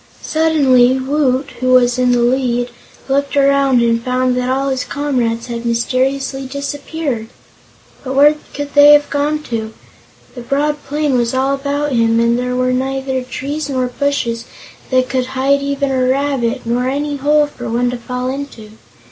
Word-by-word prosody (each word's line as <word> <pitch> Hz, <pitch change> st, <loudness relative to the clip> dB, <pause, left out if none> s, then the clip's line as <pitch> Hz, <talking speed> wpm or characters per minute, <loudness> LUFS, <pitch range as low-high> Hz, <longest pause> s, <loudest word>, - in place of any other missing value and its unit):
Suddenly 270 Hz, -6 st, +3 dB
Woot, 265 Hz, 0 st, 0 dB
who 255 Hz, 0 st, +2 dB
was 245 Hz, 0 st, +4 dB
in 250 Hz, 0 st, +3 dB
the 245 Hz, -1 st, +2 dB
lead, 245 Hz, -1 st, 0 dB, 0.4 s
looked 280 Hz, +1 st, 0 dB
around 275 Hz, -3 st, +3 dB
and 230 Hz, 0 st, +1 dB
found 255 Hz, 0 st, 0 dB
that 250 Hz, 0 st, -1 dB
all 270 Hz, +1 st, 0 dB
his 260 Hz, -1 st, -1 dB
comrades 245 Hz, -6 st, -2 dB
had 235 Hz, -1 st, -5 dB
mysteriously 265 Hz, +3 st, -1 dB
disappeared. 280 Hz, -2 st, -4 dB, 0.8 s
But 265 Hz, 0 st, -4 dB
where 290 Hz, +2 st, +6 dB, 0.2 s
could 290 Hz, 0 st, -5 dB
they 290 Hz, 0 st, +8 dB
have 290 Hz, 0 st, +3 dB
gone 300 Hz, +1 st, -1 dB
to? 225 Hz, -4 st, -5 dB, 0.6 s
The 245 Hz, -, -8 dB
broad 290 Hz, +4 st, -1 dB
plain 295 Hz, -2 st, 0 dB
was 235 Hz, +1 st, -1 dB
all 265 Hz, +1 st, +1 dB
about 285 Hz, +1 st, -2 dB
him 230 Hz, -2 st, +2 dB
and 235 Hz, 0 st, +2 dB
there 250 Hz, 0 st, -2 dB
were 255 Hz, 0 st, +1 dB
neither 265 Hz, 0 st, -2 dB
trees 280 Hz, +4 st, -5 dB
nor 260 Hz, -2 st, 0 dB
bushes 245 Hz, -3 st, -2 dB, 0.4 s
that 255 Hz, -1 st, +2 dB
could 255 Hz, 0 st, -1 dB
hide 280 Hz, +2 st, +2 dB
even 280 Hz, 0 st, -1 dB
a 255 Hz, -1 st, +1 dB
rabbit, 265 Hz, -2 st, 0 dB
nor 245 Hz, +2 st, 0 dB
any 290 Hz, +1 st, -2 dB
hole 295 Hz, +2 st, +3 dB
for 245 Hz, -5 st, -8 dB
one 245 Hz, +2 st, 0 dB
to 250 Hz, -, -4 dB
fall 250 Hz, +1 st, -4 dB
into. 265 Hz, -6 st, -7 dB
260 Hz, 165 wpm, -16 LUFS, 245-280 Hz, 0.8 s, they